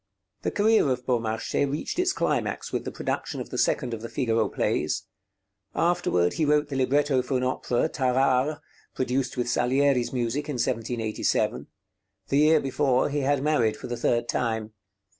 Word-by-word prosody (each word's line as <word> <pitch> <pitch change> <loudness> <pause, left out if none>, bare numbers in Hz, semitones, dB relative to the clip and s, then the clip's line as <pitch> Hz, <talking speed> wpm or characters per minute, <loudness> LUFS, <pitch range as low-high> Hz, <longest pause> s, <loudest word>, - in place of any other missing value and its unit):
The - - -1
career 215 -7 +3
of 125 -1 -2
Beaumarchais 115 +3 0
reached 155 - -3
its 365 0 +3
climax 405 - -2
with - - -2
the - - -4
production - - -3
of - - -7
the - - -4
second 125 -5 +1
of 110 - -5
the 115 - -6
Figaro 115 -5 0
plays. - - -1 0.7
Afterward 165 - +1
he 160 - -1
wrote 150 0 +2
the 140 - -4
libretto 135 +1 +2
for 130 +1 -1
an 125 - -1
opera, 125 -1 0
'Tarare,' 130 +2 +1 0.3
produced 130 +1 -1
with 120 -1 -1
Salieri's 125 +1 +2
music 130 +4 -2
in - - -1
1787; 115 -2 -1 0.6
the 140 - +2
year 155 +1 +5
before 135 -1 +1
he 145 +1 -1
had 140 0 +1
married 120 -8 +2
for - - -9
the 120 - -3
third 120 0 0
time. 110 -2 -2
130 Hz, 165 wpm, -26 LUFS, 120-145 Hz, 0.7 s, year